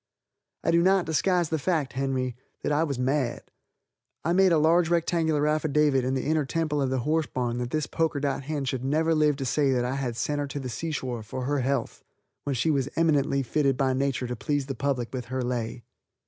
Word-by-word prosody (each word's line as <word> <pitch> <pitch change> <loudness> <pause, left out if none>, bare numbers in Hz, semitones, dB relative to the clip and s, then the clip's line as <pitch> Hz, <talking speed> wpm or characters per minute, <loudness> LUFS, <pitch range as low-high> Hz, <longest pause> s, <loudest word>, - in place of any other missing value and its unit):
I - - +2
do 170 0 +4
not 190 0 +3
disguise 175 +1 +1
the 160 - 0
fact, 155 -3 0
Henry, 130 -2 -1 0.3
that - - 0
I 150 +2 +3
was 140 -5 -2
mad. 130 0 0 0.8
I 170 - +2
made 190 0 +5
a 165 - +5
large 165 +2 +4
rectangular 165 -3 +1
affidavit 150 -3 +2
in 130 +1 0
the 130 - -2
inner 155 0 +2
temple 150 0 -1
of 135 - +1
the 130 -1 0
horse 155 +3 +1
barn 120 -1 -2
that 120 0 -3
this 155 +3 -1
poker 160 -3 -1
dot 135 -1 -2
hen 145 -2 -2
should 130 -1 -2
never 160 +4 +2
live 150 -2 +3
to 135 -1 -4
say 140 +3 +2
that 125 -2 +1
I 125 - -1
had 125 -4 -3
sent 145 +3 -1
her 145 - -2
to 140 +1 -5
the 130 -2 -5
seashore 130 -4 -3
for 125 +4 -5
her 145 +1 0
health 135 -1 -2 0.4
when 140 -2 -1
she 155 +7 +1
was 140 -2 0
eminently 145 -4 +2
fitted 135 0 +1
by 130 -1 +2
nature 135 -1 0
to 125 0 -3
please 145 +3 -1
the 135 - -4
public 130 -2 -2
with 125 -2 -4
her 130 +1 -3
lay. 120 -1 -3
140 Hz, 220 wpm, -27 LUFS, 130-155 Hz, 0.8 s, made